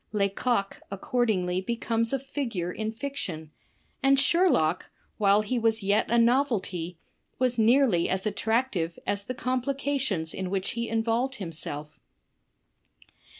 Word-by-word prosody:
Lecoq 200 +1 0
accordingly 195 -4 0
becomes 230 +1 -1
a 270 - +2
figure 245 -10 -3
in 220 +3 -3
fiction, 220 - -5 0.5
and 275 -1 +4
Sherlock, 275 - +3 0.3
while 205 0 +4
he 240 +4 -1
was 225 -2 +1
yet 200 +2 +2
a 235 - +3
novelty, 230 - +1 0.4
was 250 -2 +1
nearly 225 -5 +4
as 190 +2 -1
attractive 215 -5 0
as 200 0 -1
the 255 - -4
complications 255 - -1
in 190 -1 -4
which 190 0 -1
he 235 0 -3
involved 230 +4 0
himself. 155 - -7
220 Hz, 120 wpm, -27 LUFS, 190-255 Hz, 0.5 s, and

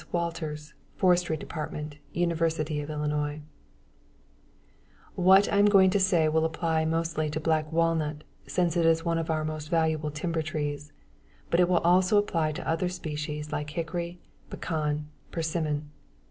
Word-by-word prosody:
WALTERS, 160 -3 -3 0.2
Forestry 180 -3 +2
Department, 150 -1 -6
University 165 -3 0
of 145 - -7
Illinois 150 0 -2 1.7
What 190 +2 +5
I 200 - +4
am 205 - +6
going 190 -2 +6
to 200 - +2
say 180 -4 +3
will 160 +1 +2
apply 160 0 0
mostly 160 -1 -1
to 155 - -3
black 155 -1 0
walnut 160 -2 0 0.2
since 175 -2 0
it 170 - +2
is 165 +1 +3
one 165 -1 +1
of 165 - -4
our 155 -1 0
most 155 -1 -5
valuable 160 -2 +1
timber 160 +2 -2
trees, 145 -2 -4 0.6
but 170 - +3
it 180 -1 +4
also 180 +2 +4
will 205 - +5
apply 165 -6 0
to - - -6
other 165 +2 0
species 150 -3 -5
like 150 0 -3
hickory, 170 +2 -4 0.3
pecan, 150 -2 -2 0.2
persimmon. 155 -3 -2
160 Hz, 145 wpm, -28 LUFS, 150-170 Hz, 1.7 s, am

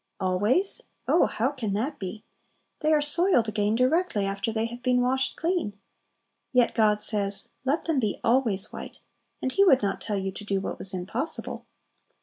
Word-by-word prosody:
"Always?" 205 - +2 0.3
Oh, 345 - +4
how 245 +5 0
can 230 -8 -3
that 255 +9 -2
be? 195 +3 -6 0.6
They 310 0 +1
are 300 -1 +4
soiled 295 - +3
again 210 0 0
directly 255 - +2
after 195 +3 -2
they 220 0 -1
have 240 +1 -7
been 250 -1 +2
washed 265 +2 +1
clean! 330 - -1 0.7
Yet 250 -2 +3
God 210 -2 +3
says, 200 -2 -2 0.2
"Let 285 +5 0
them 320 -5 +1
be 215 -5 -1
always 225 -5 +2
white;" - - -8 0.5
and 260 - 0
He 395 - +4
would 270 - +5
not 200 - -1
tell 210 -2 -2
you 195 0 -2
to 200 - -7
do 200 -1 -1
what - - -5
was 195 - -2
impossible. 225 - -2
230 Hz, 175 wpm, -26 LUFS, 205-270 Hz, 0.7 s, would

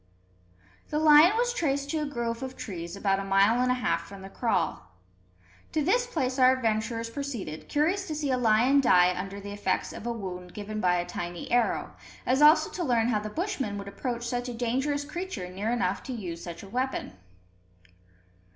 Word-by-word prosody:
The 300 - -1
lion 310 +6 +7
was 485 0 +1
traced 280 - -1
to 320 - 0
a 300 - -2
grove 235 -4 -3
of 260 -1 -6
trees, 170 -3 -6
about 195 -1 +1
a - - -3
mile 195 +5 +3
and 250 - +2
a - - +2
half 250 - -1
from 200 -1 -10
the 195 - -10
kraal. 220 - -1 0.9
To 310 - +1
this 485 +9 +2
place 265 - -2
our 255 0 +7
adventurers 230 -1 -1
proceeded, 235 - -5
curious 360 +7 +1
to 310 - -3
see 295 -2 -1
a 255 - +2
lion 245 +4 +4
die 180 -7 +5
under 195 +2 -5
the 200 0 -8
effects 205 0 -1
of 230 - -7
a - - 0
wound 180 -5 -7
given 215 +1 -5
by 180 -1 +3
a 175 0 -1
tiny 175 -1 -6
arrow, 240 -1 +1 0.3
as 260 +3 +2
also 300 +2 +6
to 360 - -3
learn 240 -5 +2
how 215 -3 +2
the 215 +1 -5
Bushmen 270 - -3
would 200 0 -7
approach 235 +3 -4
such 245 +1 -2
a 240 - -5
dangerous 265 +5 -1
creature 325 - -5
near 195 +4 -3
enough 235 -5 0
to 260 - -6
use 175 -7 -6
such 170 +1 -8
a - - -10
weapon. 255 - -2
235 Hz, 195 wpm, -28 LUFS, 200-280 Hz, 0.9 s, lion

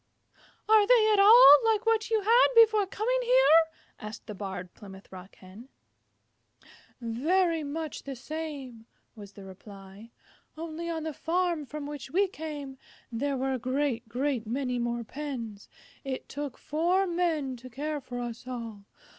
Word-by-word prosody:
"Are 430 -1 +5
they 450 -3 +5
at 410 - +3
all 405 - +9
like 445 0 +1
what 450 0 +1
you 445 -2 +1
had 460 +5 +5
before 435 -3 +5
coming 475 +6 -1
here?" 485 -10 +5 0.3
asked 215 +1 -9
the 210 - -7
Barred 190 -3 -7
Plymouth 195 -1 -14
Rock 190 +1 -12
Hen. 200 +7 -14 1.3
"Very 320 +8 0
much 305 +1 -5
the 275 -1 -7
same," 270 -5 -7 0.3
was 205 -2 -12
the 200 - -12
reply. 195 +2 -13 0.5
"Only 330 +1 -6
on 325 -2 -3
the 315 -1 -4
farm 340 -2 -1
from 295 +1 -7
which 290 -2 -7
we 390 +7 +2
came 290 -6 -8 0.3
there 275 +4 -2
were 265 +1 -1
a 260 - -3
great, 255 -2 -2
great 250 -2 -2
many 250 +1 -2
more 235 0 -2
pens. 235 -6 -7 0.3
It 270 -2 -5
took 285 -2 -6
four 345 +6 0
Men 335 -7 -1
to 255 +2 -12
care 295 +4 -4
for 245 -1 -7
us 240 +1 -7
all. 230 -5 -7
285 Hz, 155 wpm, -28 LUFS, 235-340 Hz, 1.3 s, all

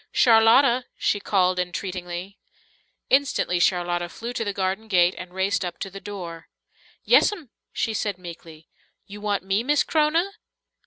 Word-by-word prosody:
"Charlotta!" 240 +2 +5
she 205 - 0
called 185 -2 +1
entreatingly. 180 +1 -5 0.7
Instantly 265 -10 +2
Charlotta 175 -1 +1
flew 235 +7 -7
to 230 - -2
the 205 - -2
garden 195 +3 -2
gate 180 -3 +3
and 180 -1 -9
raced 190 +2 0
up 175 -1 -5
to 195 - -6
the 195 +1 -9
door. 175 -5 -8 0.6
"Yes'm," 340 - +3 0.2
she 225 - -2
said 205 -3 -2
meekly. 165 -3 -11 0.4
"You 205 +1 -11
want 205 -2 -1
me, 195 +2 0
Miss 290 +4 +2
C'rona?" 325 +5 +1
195 Hz, 145 wpm, -24 LUFS, 180-225 Hz, 0.7 s, Charlotta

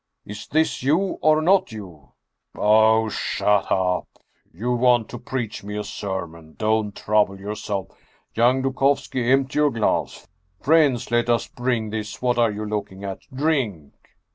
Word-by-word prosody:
" - - -55
Is 105 +1 -8
this 160 +2 0
you 165 +9 +1
or 155 0 +4
not 190 -4 +3
you! 90 - -11 0.2
" - - -57
" - - -33
Oh, 110 +1 +4
shut 105 -1 0
up! 90 -1 +1 0.4
You 115 +9 -3
want 120 -2 +3
to 120 - -7
preach 115 -6 -4
me 105 +1 -5
a 105 - -2
sermon? 85 -6 -6
Don't 110 -1 0
trouble 105 -2 +1
yourself! 100 -1 -4 0.4
Young 125 +3 +3
Dukovski, 135 -2 0
empty 135 +2 +2
your 150 -1 +4
glass! 115 -5 -1 0.3
Friends, 145 -6 +2
let 120 0 +1
us 120 -1 +2
bring 120 -3 -2
this 110 -1 -5
What 125 -1 0
are 115 -1 +4
you 105 0 -5
looking 100 -2 -5
at? 95 -1 -5
Drink!" 130 - -1
110 Hz, 160 wpm, -23 LUFS, 105-130 Hz, 0.4 s, or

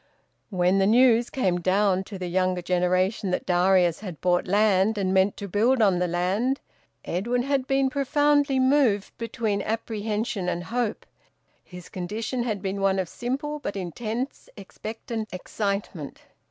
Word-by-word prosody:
When 185 0 +2
the 195 - +3
news 235 +1 +5
came 185 -9 0
down 190 +1 +2
to 200 - -8
the 185 - -5
younger 185 0 0
generation 185 +3 +1
that 180 - -2
Darius 180 -1 +3
had 185 -7 -8
bought 180 0 +1
land 205 +1 +3
and 190 -2 0
meant 190 +1 +3
to 200 - -6
build 230 +7 +2
on 195 -5 +3
the 180 - +1
land, 190 +10 0 0.5
Edwin 235 +8 -1
had 275 -1 0
been 270 -1 +2
profoundly 285 0 +2
moved 260 -7 +2
between 225 -3 -2
apprehension 215 -3 -2
and 175 0 -3
hope; 235 +1 -2 0.6
his 180 -2 -11
condition 215 +7 -4
had 215 -5 -2
been 195 +1 -2
one 195 0 +2
of 190 -2 -1
simple 280 - -3
but 205 - -5
intense 220 - -4
expectant 220 +2 -6
excitement. 195 -4 -4
205 Hz, 150 wpm, -25 LUFS, 185-240 Hz, 0.6 s, news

